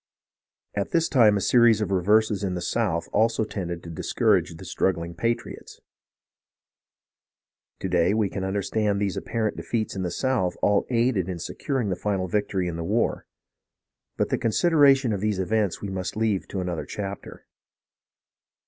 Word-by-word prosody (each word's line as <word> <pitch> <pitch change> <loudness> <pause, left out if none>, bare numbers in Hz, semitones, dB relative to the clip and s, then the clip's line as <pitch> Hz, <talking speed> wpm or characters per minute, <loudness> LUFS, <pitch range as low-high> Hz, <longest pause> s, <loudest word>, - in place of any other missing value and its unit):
At 100 -1 -2
this 165 -1 +2
time 110 -7 +5
a - - -2
series 120 0 +5
of 105 -2 -2
reverses 105 +2 +2
in 95 -2 -1
the 90 - -3
south 95 -8 -1
also 115 +1 +2
tended 85 -5 -5
to 85 - -8
discourage 90 0 +1
the 95 - -11
struggling 85 -1 -1
patriots. 115 +7 -4 2.0
To - - -2
day 90 +2 +2
we 110 -2 +2
can 95 0 -5
un 95 +1 -2
derstand 105 +1 0
that - - -2
these 100 -2 -1
apparent 110 -2 -2
defeats 110 -4 -3
in 95 - -3
the 90 - -1
south 95 -4 -1
all 105 -1 +3
aided 115 -6 +1
in 90 - -3
securing 125 - -3
the 90 - 0
final 95 0 -2
victory 95 -1 -1
in 85 -1 -4
the 85 - -4
war; 105 +7 -1 0.9
but - - 0
the - - 0
considera 140 +3 +4
tion 125 -5 -1
of 100 - -3
these 105 -2 0
events 100 0 0
we 100 - -3
must 95 +1 -4
leave 110 -4 0
to 95 - -4
another 90 -3 -3
chapter. 100 -1 -7
100 Hz, 170 wpm, -25 LUFS, 90-110 Hz, 2.0 s, time